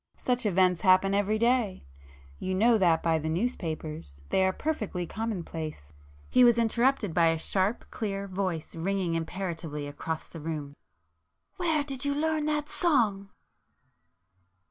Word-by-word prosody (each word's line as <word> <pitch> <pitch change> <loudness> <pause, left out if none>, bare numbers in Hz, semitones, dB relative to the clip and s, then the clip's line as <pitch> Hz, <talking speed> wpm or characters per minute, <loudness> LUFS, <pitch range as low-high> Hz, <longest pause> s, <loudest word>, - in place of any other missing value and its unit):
Such 250 -2 0
events 185 -2 +3
happen 185 +1 +4
every 205 +2 +1
day,—you 70 - -2
know 225 +3 +4
that 170 -4 +3
by 165 -1 +2
the 160 +1 -3
newspapers,—they 160 - -2
are 190 - +3
perfectly 215 - -3
common 220 -1 -3
place——" 155 - -7 0.3
He 250 - +5
was 240 -1 +6
interrupted 235 -3 +2
by 170 0 +4
a 165 0 +2
sharp 190 +6 -1
clear 200 -3 -3
voice 185 -4 -3
ringing 180 +1 -1
imperatively 165 -3 -4
across 155 +2 -5
the 165 - -10
room— 150 -3 -5 0.8
"Where 325 -5 +1
did 270 -3 -3
you 285 0 +1
learn 310 0 0
that 300 -1 0
song?" 220 - +1
190 Hz, 135 wpm, -28 LUFS, 160-235 Hz, 0.8 s, was